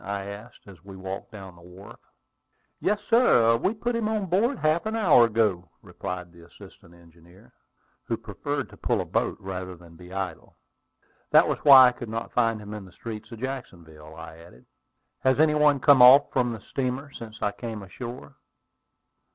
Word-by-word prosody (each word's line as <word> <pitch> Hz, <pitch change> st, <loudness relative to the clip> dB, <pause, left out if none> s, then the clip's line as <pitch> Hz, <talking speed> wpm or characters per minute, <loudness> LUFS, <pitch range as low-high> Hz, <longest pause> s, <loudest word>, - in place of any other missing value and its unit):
I 100 Hz, 0 st, -5 dB
asked, 105 Hz, +4 st, -11 dB
as 95 Hz, -3 st, -15 dB
we 100 Hz, -1 st, -12 dB
walked 95 Hz, +4 st, -7 dB
down 95 Hz, -4 st, -11 dB
the 85 Hz, -, -18 dB
wharf. 90 Hz, +3 st, -14 dB, 0.8 s
"Yes, 205 Hz, +1 st, 0 dB
sir; 120 Hz, -, +4 dB
we 190 Hz, -, -1 dB
put 240 Hz, +2 st, -3 dB
him 225 Hz, -2 st, -1 dB
on 215 Hz, -3 st, -2 dB
board 215 Hz, +9 st, 0 dB
half 155 Hz, +4 st, 0 dB
an 220 Hz, -, -3 dB
hour 170 Hz, -, +5 dB
ago," 105 Hz, -6 st, -1 dB
replied 90 Hz, -1 st, -7 dB
the 85 Hz, -1 st, -16 dB
assistant 95 Hz, 0 st, -17 dB
engineer, 85 Hz, +1 st, -21 dB, 0.5 s
who -, -, -2 dB
preferred -, -, -5 dB
to -, -, -15 dB
pull -, -, -1 dB
a -, -, -3 dB
boat -, -, -2 dB
rather 95 Hz, -1 st, -7 dB
than 85 Hz, -1 st, -17 dB
be 90 Hz, +1 st, -14 dB
idle. 95 Hz, -4 st, -6 dB, 0.7 s
"That -, -, +5 dB
was -, -, -2 dB
why 130 Hz, -3 st, +8 dB
I -, -, -5 dB
could 120 Hz, -2 st, -9 dB
not 115 Hz, +1 st, -6 dB
find 115 Hz, -2 st, +1 dB
him 105 Hz, 0 st, -9 dB
in 105 Hz, -2 st, -8 dB
the 95 Hz, -, -16 dB
streets 110 Hz, +4 st, -9 dB
of 115 Hz, -1 st, -10 dB
Jacksonville," 85 Hz, -, -8 dB
I 80 Hz, 0 st, -11 dB
added. 85 Hz, -7 st, -17 dB, 0.5 s
"Has 130 Hz, +1 st, +1 dB
any 155 Hz, -1 st, +4 dB
one 150 Hz, -2 st, +3 dB
come 135 Hz, 0 st, +5 dB
off 130 Hz, +3 st, +7 dB
from 125 Hz, -2 st, +1 dB
the 110 Hz, -3 st, -7 dB
steamer 135 Hz, +4 st, -4 dB
since 110 Hz, -3 st, -11 dB
I 105 Hz, -, 0 dB
came 110 Hz, -2 st, -7 dB
ashore?" 120 Hz, +6 st, -10 dB
110 Hz, 185 wpm, -25 LUFS, 90-135 Hz, 0.8 s, why